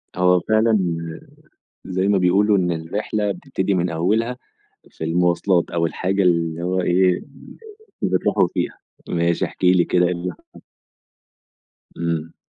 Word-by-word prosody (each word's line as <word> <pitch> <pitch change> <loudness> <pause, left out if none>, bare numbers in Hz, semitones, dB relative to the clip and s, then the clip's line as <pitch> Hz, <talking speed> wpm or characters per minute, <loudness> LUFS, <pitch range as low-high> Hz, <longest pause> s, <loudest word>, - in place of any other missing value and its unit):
هو 90 0 +4
فعلًا 110 +3 +2 1.1
زي 95 +1 -1
ما 100 -1 +3
بيقولوا 100 +3 +3
إن 90 -2 0
الرحلة 100 +5 -2
بتبتدي 100 -7 -2
من 90 -1 0
أوّلها 110 +9 0 0.5
في - - -7
المواصلات، 85 +2 +1
أو 85 -1 0
الحاجة 95 +4 -1
اللي 85 -2 +1
هو 90 +1 0
إيه، 90 +1 +3 0.9
اللي 95 0 +2
بتروحوا - - +2
فيها، - - -2 0.3
ماشي 85 0 0
احكِ - - -6
لي 90 -1 +5
كده، 90 +1 +2
إيه 90 - 0
اللي 90 +1 -4
حصل؟ - - -19 1.4
إمم. 85 -1 -3
90 Hz, 135 wpm, -21 LUFS, 85-95 Hz, 1.4 s, لي